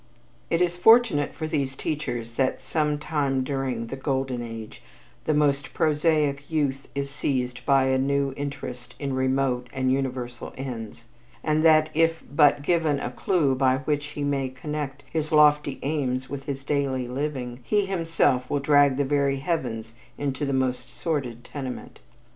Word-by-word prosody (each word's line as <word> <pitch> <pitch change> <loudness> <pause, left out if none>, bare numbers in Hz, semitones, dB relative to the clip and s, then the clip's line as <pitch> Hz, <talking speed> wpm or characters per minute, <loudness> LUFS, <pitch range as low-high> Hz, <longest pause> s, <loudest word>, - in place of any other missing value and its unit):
It 165 +1 +3
is 175 0 -1
fortunate 225 -7 +5
for 160 - -5
these 140 -4 -1
teachers 120 -7 -3
that 130 +2 0
sometime 150 -3 0
during 130 -4 -2
"The 125 - -5
Golden 135 -2 -2
Age" 115 -2 -8 0.4
the 155 - +2
most 145 -1 +1
prosaic 150 -2 +1
youth 140 -4 -1
is 140 0 -2
seized 125 -4 -2
by 135 -1 +5
a 130 0 +2
new 140 0 +1
interest 130 -3 -6
in 140 -2 -3
remote 130 -1 0
and 130 -1 0
universal 130 -2 -3
ends, 115 -4 -6 0.4
and 155 0 +2
that 155 -1 +5
if 165 +1 +2
but 145 -1 +5
given 160 -3 +2
a 125 - -3
clue 150 -1 +1
by 130 0 +3
which 145 +2 -1
he 145 - -1
may 140 -2 0
connect 140 0 -5
his 155 -1 -2
lofty 150 -2 +4
aims 135 -3 -1
with 140 -1 -5
his 135 -1 -4
daily 135 -3 0
living, 130 -2 -3
he 205 - +1
himself 165 -9 +1
will 145 - +1
drag 145 -1 +4
the 140 - +1
very 140 0 +1
heavens 120 -8 -3 0.2
into 140 0 -2
the - - 0
most 130 -1 -1
sordid 130 -8 -3
tenement. 130 -3 -7
140 Hz, 155 wpm, -25 LUFS, 130-150 Hz, 0.4 s, fortunate